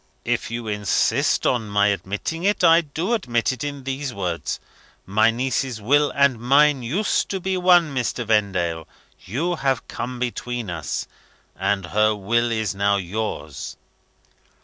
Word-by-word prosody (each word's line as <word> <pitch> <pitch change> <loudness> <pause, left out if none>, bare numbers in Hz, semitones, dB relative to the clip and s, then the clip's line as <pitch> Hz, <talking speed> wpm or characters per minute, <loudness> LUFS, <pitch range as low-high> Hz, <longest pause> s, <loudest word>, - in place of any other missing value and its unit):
"If - - -1
you 115 0 -5
insist 105 -2 +1
on 115 -4 +1
my 100 0 +3
admitting 105 - -3
it, 200 -1 +1
I 165 0 +7
do 165 +8 -3
admit 120 - 0
it 130 0 -5
in 145 -2 -5
those 135 +1 -3
words. 90 -4 -3 0.5
My 105 +4 +3
niece's 125 0 -1
will 145 +7 +3
and 140 -4 +3
mine 140 +3 +4
used 165 - 0
to 195 - -2
be 190 +1 -1
one, 175 -4 +4
Mr. 120 -2 -2
Vendale. 95 -7 0 0.4
You 165 - -2
have 135 -4 -1
come 125 +1 -5
between 120 -3 -3
us, 80 -3 -3 0.5
and 95 0 0
her 105 +4 +2
will 120 +4 0
is 110 -4 -1
now 100 +1 +2
yours. 90 -7 -4
120 Hz, 150 wpm, -22 LUFS, 105-140 Hz, 0.5 s, I